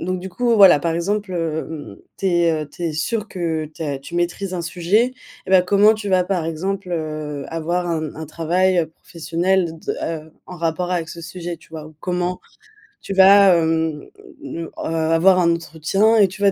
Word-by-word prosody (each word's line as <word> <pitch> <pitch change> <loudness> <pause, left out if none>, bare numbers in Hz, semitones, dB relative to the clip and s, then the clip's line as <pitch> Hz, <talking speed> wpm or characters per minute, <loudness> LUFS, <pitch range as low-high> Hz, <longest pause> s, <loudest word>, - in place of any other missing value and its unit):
donc 185 +1 -2
du 190 +1 -7
coup 235 +6 +1
voilà, 195 -7 +8
par 165 0 -1
exemple, 200 +3 -2
hem, 160 -9 -4 0.2
tu 195 - -2
es, 175 -2 +3
heu 150 - -16
tu 175 - -10
es 165 - -1
sûr 210 +7 -2
que 165 -3 -2
tu - - -7
as 145 -3 -3
tu 135 +5 -11
maîtrises 175 +2 -2
un 175 - -3
sujet, 185 +9 +1 0.3
et - - -6
bah, 190 -1 +7
comment 205 +3 +5
tu 215 -1 -5
vas, 185 -2 +3
par 180 -4 -1
exemple, 190 +4 -3
heu, 155 -3 -4
avoir 170 +2 -2
un 155 -2 -2
un 160 - -6
travail, 175 +4 +1
heu, 165 - +2
professionnel 170 +2 -2
de - - -3
de - - -7 0.3
heu 160 - -20
en 180 - -9
rapport 170 +2 -2
avec 170 -2 -2
ce 170 - -8
sujet 170 0 -6
tu - - -21
vois? 155 -2 -8
Ou 155 - -15
comment 180 0 -2 0.6
tu 195 - -5
vas, 195 -1 +7
hem, 160 -1 0 0.4
ne 170 - -6
heu, - - -15
avoir 165 +3 +2
un 170 -1 +3
entretien 170 +7 +1
et 205 -3 +6
tu 195 +3 -11
vas 200 - +5
175 Hz, 205 wpm, -20 LUFS, 160-190 Hz, 0.6 s, voilà